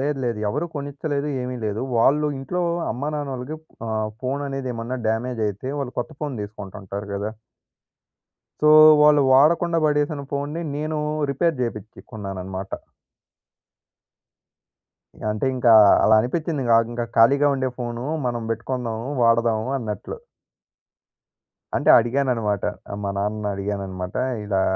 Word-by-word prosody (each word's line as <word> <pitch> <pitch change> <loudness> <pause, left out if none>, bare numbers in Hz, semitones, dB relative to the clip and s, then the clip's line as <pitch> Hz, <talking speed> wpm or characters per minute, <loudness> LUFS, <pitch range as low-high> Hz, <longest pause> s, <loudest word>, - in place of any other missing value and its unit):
లేదు 145 +1 -1
లేదు. 115 -3 -1
ఎవరు 150 +10 -1
కొనిచ్చలేదు 145 +1 -3
ఏమీ 125 0 -4
లేదు. 105 +1 -2 0.2
వాళ్ళు 150 +5 +3
ఇంట్లో 175 +7 -3 0.3
అమ్మానాన్నలకి 145 0 -4 0.3
ఆహ్, 110 -1 -1
ఫోననేది 135 0 -3
ఏమన్నా 115 +3 -4
డ్యామేజ్ 115 +1 -2
అయితే 100 +6 -6
వాళ్ళు 130 -3 -4
కొత్త 140 +6 -3
ఫోన్ 145 -3 -3
తీసుకుంటుంటారు 100 -1 -7
గదా! 100 +2 -3 1.3
సో 150 - +5 0.3
వాళ్ళు 150 -1 +6
వాడకుండా 165 +4 +4
బడేసిన 150 0 0
ఫోన్‌ని 145 +4 -3 0.2
నేను 155 +1 -2 0.3
రిపేర్ 165 +3 +1
జేపించికొన్నానన్నమాట. 100 -4 -6 2.6
అంటే 105 +4 -1
ఇంకా 120 -2 +4
అలా 100 - +5
అలా 110 - +6
అనిపించింది 155 +2 -2
గాగింకా 115 +1 +2
ఖాళీగా 140 +6 +5
ఉండే 130 -1 -1
ఫోను 120 -1 -4 0.2
మనం 120 -1 -1
బెట్టుకుందాము 115 0 -3 0.2
వాడదాం 115 -1 +3
అన్నట్లు. 110 - -5 1.6
అంటే - - +1
అడిగానన్నమాట. 120 -4 0 0.3
ఆహ్, 100 - -5
మా 100 - -1
నాన్నని 105 +1 -2
అడిగానన్నమాట 95 -2 -4 0.3
ఇలా 95 -2 0
120 Hz, 115 wpm, -23 LUFS, 110-140 Hz, 2.6 s, వాళ్ళు